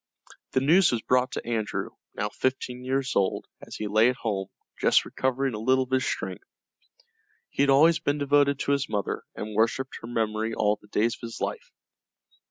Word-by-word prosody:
The 130 - +2
news 170 +7 +5
was 115 -2 -1
brought 125 0 +2
to - - -4
Andrew, 115 -2 -2 0.2
now - - -2
fifteen 125 -1 -2
years 135 +1 -1
old, 95 -1 +1 0.2
as - - -9
he 110 - -4
lay 110 +3 +4
at 125 - -1
home, 100 -6 -3 0.3
just - - +4
recovering 130 0 -1
a 105 - -4
little 130 +4 +3
of 130 - -13
his 130 0 +2
strength. 95 -2 -4 1.0
He - - -1
had 140 - +4
always 160 +5 +5
been 145 +1 0
devoted 145 -1 +3
to - - 0
his 140 0 0
mother 100 -2 -2
and 105 0 -6
worshipped 115 +4 0
her 115 - -8
memory 110 -1 -1
all 105 0 +1
the 105 - -19
days 110 +3 +1
of - - -11
his 115 - -8
life. - - -4
125 Hz, 190 wpm, -26 LUFS, 110-135 Hz, 1.0 s, news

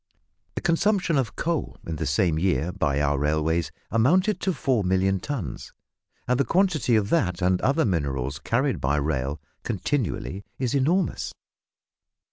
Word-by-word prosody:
The - - -3
consumption 180 0 +2
of 120 -5 0
coal, 165 -3 -2
in 80 -1 -4
the - - -2
same 80 +3 +2
year, 90 -1 +1
by 75 -7 0
our 75 -1 +1
railways 80 +3 +1 0.2
amounted 180 - +3
to 190 - +1
four 130 - 0
million 95 +1 +2
tons, 100 - -5 0.5
and 125 +1 +2
the - - +5
quantity 170 - +2
of 105 -2 +1
that 90 - +1
and 90 0 +2
other 140 +4 +2
minerals 70 - -1
carried 130 +3 0
by 70 +2 +1
rail 70 -1 -1 0.2
continually 105 - -2
is 125 -3 -1
enormous. 160 +7 0
100 Hz, 145 wpm, -25 LUFS, -, 0.5 s, the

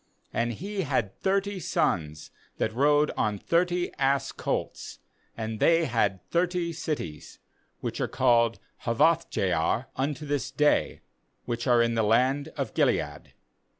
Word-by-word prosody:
4And 120 +1 0
he 200 - -4
had 130 - -1
thirty 195 0 0
sons 80 - -1 0.3
that - - -1
rode 145 +4 +3
on 105 -2 0
thirty 175 - 0
ass 135 0 +1
colts, - - -4 0.4
and 110 -1 -4
they 165 0 +4
had 100 -7 0
thirty 175 0 0
cities, 150 - -5 0.4
which - - -4
are - - +1
called 115 -1 +3 0.3
*Hawoth 160 +8 +3
jair 90 +6 0
unto 145 +3 -2
this 145 -4 -2
day, 145 +2 +1 0.4
which 120 +1 -3
are 120 -1 +5
in 115 0 0
the 115 - +1
land 130 +7 +2
of - - -3
Gilead. - - 0
135 Hz, 135 wpm, -27 LUFS, 115-165 Hz, 0.4 s, are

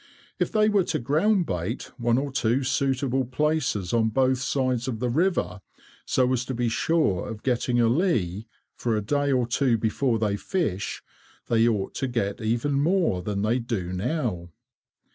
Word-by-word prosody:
If - - 0
they 215 -1 +3
were 205 -3 +3
to - - -1
groundbait 140 - 0 0.2
one 120 0 +2
or 140 +1 -2
two 125 +1 +1
suitable 135 0 0
places 130 - -1
on 110 -1 +3
both 130 +2 +2
sides 130 -2 -1
of 125 -4 -2
the 125 0 -1
river, 125 - 0 0.5
so 130 0 +2
as 125 -1 0
to 130 - -4
be 120 0 0
sure 130 - +1
of 110 -1 -7
getting 125 -1 +1
a 115 - +4
lee, 115 - 0 0.3
for 115 -3 -1
a - - -1
day 145 +5 0
or 125 -2 +2
two 120 0 +1
before 115 +2 0
they 105 -2 0
fish, 105 - -2 0.5
they 115 0 +4
ought 105 -4 -1
to 135 - -2
get 115 -2 -2
even 120 +6 0
more 165 - +2
than 100 +1 -2
they 115 +4 +1
do 105 -7 -3
now. 100 - -2
120 Hz, 170 wpm, -25 LUFS, 110-140 Hz, 0.5 s, a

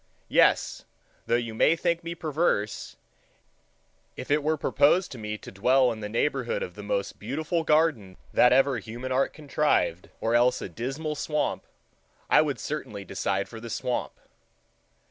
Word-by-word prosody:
Yes, - - +3 0.4
though - - +3
you 120 -2 -2
may 150 +8 +4
think 170 0 -1
me 170 0 -5
perverse, 150 -10 -1 1.2
if 130 - -6
it 150 +1 +3
were 155 +2 0
proposed 150 +6 +3
to 125 - -8
me 105 0 -4
to - - -11
dwell 125 +6 +3
in 110 - -6
the 105 -1 -5
neighborhood 150 - -1
of - - -6
the - - -9
most - - -3
beautiful 160 +3 -2
garden 150 - +1 0.2
that 125 - +6
ever 135 -1 +4
human 120 +5 -7
art 130 +1 +2
contrived, 145 - 0
or 115 - 0
else 120 +1 +4
of - - -5
a - - -7
dismal 135 - -4
swamp, 150 0 -2 0.6
I - - +7
should 145 -3 -2
certainly 110 -10 -5
decide 100 +1 -2
for 115 +2 -9
the 115 +1 -8
swamp. 120 +2 -2
130 Hz, 165 wpm, -27 LUFS, 115-155 Hz, 1.2 s, I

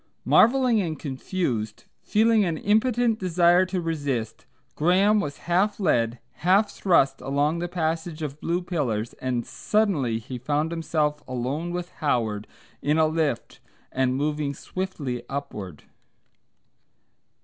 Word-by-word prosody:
Marvelling 245 -2 +5
and 160 -4 -3
confused, 130 - -3 0.2
feeling 220 0 +3
an 170 -4 -1
impotent 225 +3 +2
desire 180 0 +4
to 185 0 -2
resist, 145 -9 -3 0.3
Graham 190 +6 +3
was 145 -7 -3
half 190 +5 +1
led, 120 - +1 0.2
half 190 +6 +3
thrust, 135 -8 +2
along 145 +4 0
the 175 - -2
passage 165 -1 -2
of 150 0 -5
blue 175 +2 -1
pillars, 125 -11 -2
and 125 -2 -1
suddenly 175 - 0
he 120 +3 -7
found 150 +5 -1
himself 155 -3 -1
alone 130 +7 -3
with 175 0 -4
Howard 110 -8 0 0.3
in 150 +2 +1
a 160 - +5
lift 155 -5 -1 0.3
and 130 -1 +1
moving 145 0 -1
swiftly 150 -11 -4
upward. 105 - -6
155 Hz, 125 wpm, -25 LUFS, 135-185 Hz, 0.3 s, Marvelling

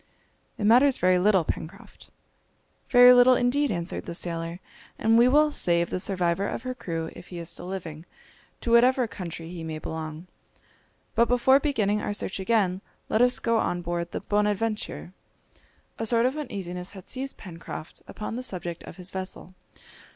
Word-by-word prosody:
"It - - -4
matters 250 +5 +5
very 185 0 +3
little, 190 -1 +4
Pencroft!" 160 +1 -7 0.8
"Very 245 0 +8
little 250 +1 +7
indeed," 265 +4 +1
answered 170 -4 -4
the 170 - -5
sailor; 170 0 -4 0.4
"and 225 +1 +3
we 235 +2 +6
will 300 +3 +4
save 170 -10 +2
the - - -1
survivor 180 0 0
of - - -5
her 255 0 -3
crew 165 -9 -5
if - - -12
he 175 - -8
is 170 0 -4
still 175 - -4
living, 170 -4 -7 0.5
to 235 - -2
whatever 250 +2 +5
country 170 -5 -7
he 170 -2 -7
may 160 -1 -5
belong. 160 +1 -6 0.9
But 235 +1 +3
before 245 +2 +4
beginning 210 -9 0
our 205 - -3
search 195 - -4
again 190 -3 +1 0.3
let 220 - +2
us 245 0 +4
go 230 -1 +1
on 175 -4 -1
board 170 0 -3
the - - -4
Bonadventure." 210 -2 -1 0.9
A 225 - -2
sort 230 +1 +3
of 260 +3 +1
uneasiness 190 - -5
had 190 -3 -12
seized 270 +1 -4
Pencroft 170 -3 -9
upon 215 +1 -6
the 250 - -3
subject 175 -8 -5
of - - -11
his 180 0 -5
vessel. 185 -1 -6
195 Hz, 170 wpm, -26 LUFS, 175-240 Hz, 0.9 s, Very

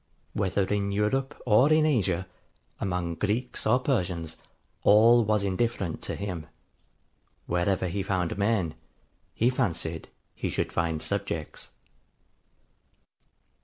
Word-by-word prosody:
Whether 95 -1 0
in 100 0 -1
Europe 130 +8 0
or 125 +6 +5
in 155 0 +5
Asia, 95 - +1 0.5
among 90 -3 -2
Greeks 105 +10 -1
or 115 +3 +5
Persians, 90 - -1 0.5
all 115 +3 +6
was 105 -1 +1
indifferent 100 -3 -1
to - - -4
him: 90 -6 -5 1.0
wherever 90 +2 0
he 95 +3 -2
found 95 -3 -1
men, 100 -6 +1 0.6
he 120 +3 +3
fancied 85 -10 -2 0.2
he - - -3
should - - -2
find 80 -2 0
subjects.' 100 -6 -3
100 Hz, 110 wpm, -27 LUFS, 90-115 Hz, 1.0 s, all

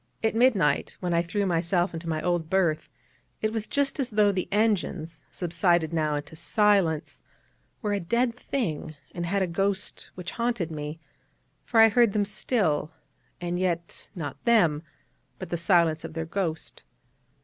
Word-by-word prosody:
At 220 - +2
midnight 225 -9 +2
when 175 -2 -1
I 170 - +3
threw 200 +4 -1
myself 175 +1 +1
into 165 0 -5
my 155 -1 -2
old 175 -3 0
berth, 170 -5 +1 0.5
it 215 0 +1
was 220 -2 -2
just 280 0 0
as 260 -3 0
though 210 -1 +4
the 185 -2 -2
engines, 190 -6 0
subsided 170 -1 +1
now 155 -2 +1
into 145 +2 -6
silence, 175 -2 +1 0.6
were 210 -1 0
a 200 - 0
dead 235 +7 +1
thing, 170 - -3 0.2
and 175 -1 -3
had 195 +2 +1
a - - +2
ghost 195 +3 -2
which 180 -2 -6
haunted 230 -8 -1
me; 150 +1 -5 0.7
for 230 - +2
I 225 0 +9
heard 230 -1 +4
them 205 -1 +2
still, 190 - 0 0.5
and 175 0 -2
yet 170 -2 -2
not 160 -5 -6
them, 175 -11 +4 0.6
but 185 - -7
the - - +1
silence 170 -2 +3
of - - -7
their 165 0 -2
ghost. 165 -2 -3
180 Hz, 160 wpm, -27 LUFS, 165-210 Hz, 0.7 s, I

